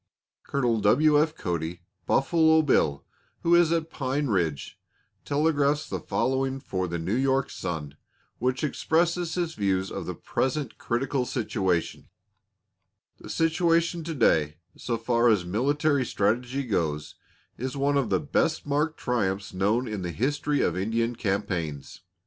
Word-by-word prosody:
Col. 120 -5 0
W. 145 +9 +4
F. 155 0 0
Cody 85 - -4 0.2
("Buffalo 160 +2 +4
Bill"), 75 - +2 0.4
who 170 - +3
is 170 -1 +5
at 165 -1 0
Pine 140 +1 -1
Ridge, 85 -9 -1 0.5
telegraphs 145 0 +1
the - - -3
following 135 0 -1
for 95 -8 -3
the 85 0 -3
New 85 +5 -2
York 135 +2 +1
Sun, 75 -4 -5 0.4
which 130 +4 -1
expresses 170 +3 0
his 170 -2 -1
views 95 -4 0
of - - -5
the - - -4
present 135 -1 -2
critical 130 +2 -1
situation: 95 -8 -2 1.1
The - - -11
situation 165 +1 +1
to 165 -1 -4
day, 75 - +2 0.2
so 120 -2 -3
far 115 +1 +2
as 100 -5 +2
military 140 - +1
strategy 120 +5 0
goes, 80 - -2 0.5
is 130 +3 -4
one 140 +1 +1
of 140 -4 +1
the - - +2
best 155 +1 0
marked 150 +2 0
triumphs 100 -5 -1
known 105 +7 +1
in 105 -3 -4
the 90 -1 -3
history 145 - 0
of - - +1
Indian 115 +5 -1
campaigns. 90 - -3
125 Hz, 140 wpm, -26 LUFS, 95-150 Hz, 1.1 s, is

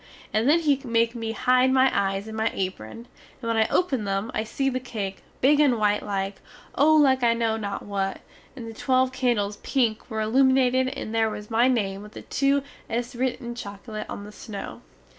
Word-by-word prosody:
And 220 +5 +2
then 335 +3 +5
he 285 -4 +2
make 230 -2 +1
me 225 -2 -4
hide 255 +2 +3
my 265 0 +4
eyes 195 +1 0
in 220 - -7
my 220 +1 +1
apron, 185 - -5 0.3
and 235 - -6
when 230 - +1
I 220 -1 +3
open 275 -11 +1
them, 195 +3 -2
I 215 - -1
see 270 +5 -2
the 255 -1 0
cake, 205 -6 -5 0.2
big 290 +3 +5
and 275 -5 +4
white 210 -1 +2
like 195 -1 -3 0.4
oh 310 +3 +4
like 270 -4 +4
I 235 -1 +3
know 230 -1 0
not 205 -2 -4
what 195 -1 -2 0.3
and 240 -4 -8
the 225 - -7
twelve 255 +2 +1
candles 235 -6 0
pink 235 -5 -1
were 220 -2 -3
illuminated 260 +2 +3
and 225 -3 -5
there 225 -1 +2
was 210 +1 -8
my 235 +3 +4
name 200 -6 0
with 210 +1 -12
the - - -9
two 275 0 +1 0.3
es 235 +1 -3
writ 260 +1 -1
in 240 -1 -5
chocolate 215 -1 -7
on 200 - -6
the 210 - -10
snow. 210 -2 -8
230 Hz, 205 wpm, -25 LUFS, 210-260 Hz, 0.4 s, then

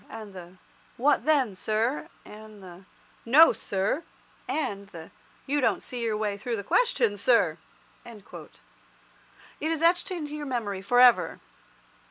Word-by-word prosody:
and 215 -3 -9
the 180 0 -12 0.4
'What 280 +4 +2
then, 275 -9 +2
sir?' 225 - -2 0.2
and 215 -1 -13
the 180 +1 -13 0.4
'No, 295 +8 +6
sir!' 200 +9 -2 0.5
and 205 -10 -3
the 165 -4 -12 0.3
'You 290 +1 0
don't - - 0
see 245 -1 -6
your 225 -2 -1
way 210 -2 -2
through 235 +3 -3
the 200 - -5
question, 475 - +1
sir!'" - - +2 0.4
It 225 -4 -12 1.2
is 320 +1 -1
etched 345 +3 +2
into 305 -5 -5
your 295 -1 -6
memory 215 -7 -3
for 245 +5 +1
ever. 250 -1 +5
230 Hz, 140 wpm, -26 LUFS, 200-295 Hz, 1.2 s, No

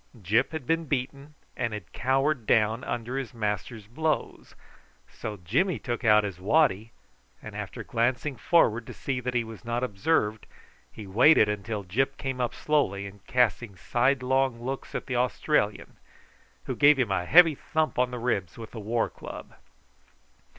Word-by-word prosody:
Gyp 110 - +1
had 160 -5 -5
been 165 +4 0
beaten, 140 +2 -4 0.2
and 115 -3 -2
had 105 -5 -8
cowered 135 0 0
down 110 +3 +2
under 120 +1 -3
his 130 -2 -7
master's 105 0 -3
blows, 155 +8 -3 0.5
so 105 -1 -7
Jimmy 135 - 0
took 120 +3 -4
out 105 -2 +5
his 100 -4 -5
waddy, 110 -1 +2 0.5
and - - -10
after - - -6
glancing 130 +4 -1
forward 120 -3 +2
to - - -9
see 135 -2 -3
that 125 0 -4
he 120 - +2
was 110 0 -10
not 120 +1 -2
observed, 110 -1 0 0.4
he 110 - -10
waited 110 +5 +5
until 105 0 -3
Gyp 135 +9 -1
came 130 -2 -3
up 120 - -2
slowly, 100 -10 0
and 100 -1 -11
casting 115 -4 +1
sidelong 130 +3 +1
looks 135 +2 -5
at - - -3
the 130 -3 -2
Australian, 125 -3 0 0.7
who - - -4
gave 145 0 +6
him 120 -6 0
a 90 -2 0
heavy 165 - +7
thump 155 0 -2
on 125 0 +3
the 125 - -5
ribs 105 -8 -2
with 115 -1 -9
the 115 - -7
war 115 +2 0
club. - - -10
120 Hz, 165 wpm, -27 LUFS, 105-135 Hz, 0.7 s, heavy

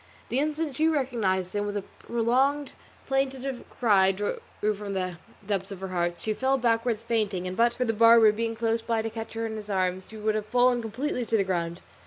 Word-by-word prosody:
The 250 - +1
instant 305 -1 -1
she 315 +1 +3
recognised 225 - 0
him, 205 0 -1
with 205 0 -2
a 200 - -3
prolonged 260 +7 0 0.3
plaintive 270 -1 -1
cry 195 -5 +4
drawn 205 +2 -3 0.3
from 200 -1 -5
the 185 -2 -3 0.3
depths 195 -1 -2
of 195 - -7
her 190 - -4
heart, 175 -1 -1
she 215 - -1
fell 265 +4 +1
backwards 230 -2 +1
fainting, 210 -6 -1
and 185 0 -4
but 235 +2 +4
for 250 +1 -1
the 225 - +1
barber 230 0 +7
being 225 +1 -2
close 230 0 0
by 225 -1 -1
to 225 - -3
catch 225 0 -6
her 225 0 -2
in 220 -1 -4
his 210 -1 -8
arms, 185 -1 -1
she 220 - -10
would 215 0 0
have 215 0 -2
fallen 245 +1 +3
completely 250 +4 -2
to 225 - +2
the 200 - +3
ground. 170 -2 -2
225 Hz, 215 wpm, -27 LUFS, 195-245 Hz, 0.3 s, barber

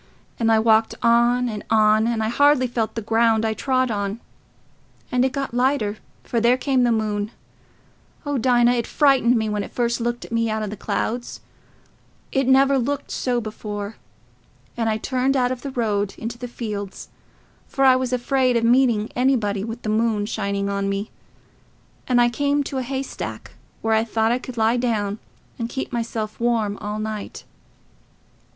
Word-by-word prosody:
And 225 -1 +2
I 220 - +5
walked 220 0 +3
on 240 +1 +3
and 210 -3 -5
on, 215 0 +4
and 230 -2 0
I 220 - 0
hardly 285 +2 +4
felt 230 -3 -2
the 225 - -3
ground 225 0 +2
I 220 - +1
trod 255 +2 0
on; 200 +1 -2 0.9
and 250 0 +2
it 260 - +1
got 275 -2 -4
lighter, 245 -4 +1 0.3
for 235 - -1
there 240 +2 +4
came 265 -1 +1
the 240 -1 +3
moon—oh, 220 +6 -5
Dinah, 240 0 +4
it 240 -2 -1
frightened 270 -5 +3
me 220 -1 0
when 210 -1 -1
it - - -8
first 235 -1 -1
looked 240 +1 -2
at - - -14
me 230 0 +1
out 215 0 -1
o' - - -1
the 210 +1 -5
clouds—it 240 +4 -5
never 270 +1 +5
looked 280 +3 -3
so 245 -2 0
before; 210 -1 -6 0.8
and 230 -2 0
I 215 - 0
turned 260 +3 0
out 250 -1 +2
of 255 -1 -4
the 280 - -5
road 210 -6 -1
into 230 +1 -6
the 250 - -5
fields, 210 -5 -6 0.6
for 270 - +1
I 260 -1 +7
was 255 -1 -1
afraid 255 0 +1
o' - - +1
meeting 235 -2 +3
anybody 225 -6 +1
with 225 +2 -6
the 215 - -2
moon 215 -1 +1
shining 200 -2 -2
on 200 0 -1
me. 200 +2 -3 1.0
And 250 -1 +3
I 240 - +5
came 285 +4 0
to 270 -1 -4
a - - -1
haystack, 265 +2 -5 0.3
where 225 0 +2
I 220 0 +3
thought 225 0 0
I 245 - +1
could 255 -1 -9
lie 225 +2 +3
down 215 -4 -1 0.4
and 230 0 -2
keep 265 0 -5
myself 225 -2 -3
warm 225 -4 0
all 210 0 -4
night. 215 -1 -5
235 Hz, 175 wpm, -22 LUFS, 215-250 Hz, 1.0 s, I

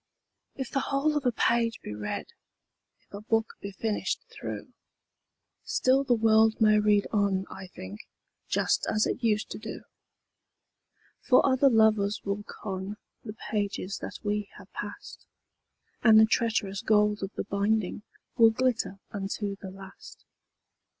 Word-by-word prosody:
II. - - -6
If 255 - -12
the 275 - +1
whole 280 +3 0
of 285 -3 0
a - - +4
page 230 0 +1
be - - -6
read, 105 0 -4 0.8
If - - -32
a 200 - -6
book 225 0 0
be 200 - -5
finished 210 +2 -2
through, - - -7 0.9
Still 265 +2 +2
the 250 -3 +3
world 220 0 +4
may 215 -1 +5
read 210 -1 +3
on, 200 -2 +1
I 190 -1 -8
think, 100 - -9 0.5
Just - - +1
as 215 - +2
it 250 - -3
used 215 -2 +1
to - - -5
do; 220 0 -7 1.4
For 255 - +4
other 270 +1 +4
lovers 220 -3 +3
will 200 +1 -2
con 195 0 -6 0.3
The 210 - -7 0.2
pages 200 -2 -2
that - - -6
we 210 -1 -1
have - - -15
passed, - - -8 0.7
And 220 -2 +7
the 220 - +8
treacherous 215 -4 0
gold 210 -1 +3
of 195 0 -4
the - - -2
binding 200 0 0 0.4
Will 225 -2 +8
glitter 225 -3 0
unto 200 0 -3
the 195 - -8
last. 195 0 -13
215 Hz, 150 wpm, -28 LUFS, 200-225 Hz, 1.4 s, the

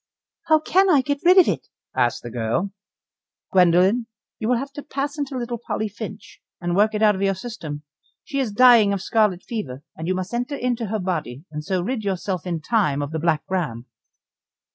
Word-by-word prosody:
"How 315 -1 +5
can 380 +5 +3
I 295 -6 +5
get 285 +2 -2
rid 360 +2 +6
of 370 - +8
it?" - - -1 0.3
asked 120 - +1
the 120 - -7
girl. 120 - -1 0.8
"Gwendoline, 185 +6 +4 0.3
you 220 - -2
will 250 - +3
have 275 +3 -5
to 290 - -7
pass 280 0 -3
into 280 -2 -3
little 240 -1 -3
Polly 215 -1 -2
Finch, 205 -1 -9 0.2
and 175 0 -1
work 215 +2 +3
it 210 - 0
out 210 -1 +6
of 190 - -5
your 195 -1 +2
system. 175 -9 -7 0.4
She 275 - -3
is 255 -5 0
dying 230 -2 +6
of 195 -1 -3
scarlet 210 -5 +2
fever, 145 - -5
and 160 - -6
you 185 - +1
must 185 +3 -4
enter 245 +4 -2
into 245 -3 -1
her 215 +2 -1
body, 165 - -3
and 150 0 -5
so 185 +2 -1
rid 235 +2 -2
yourself 190 -2 -2
in 170 -3 -2
time 155 -8 +1
of 145 - -5
the 160 - -2
Black 160 -1 +1
Ram." 150 -11 -2
205 Hz, 205 wpm, -23 LUFS, 175-245 Hz, 0.8 s, of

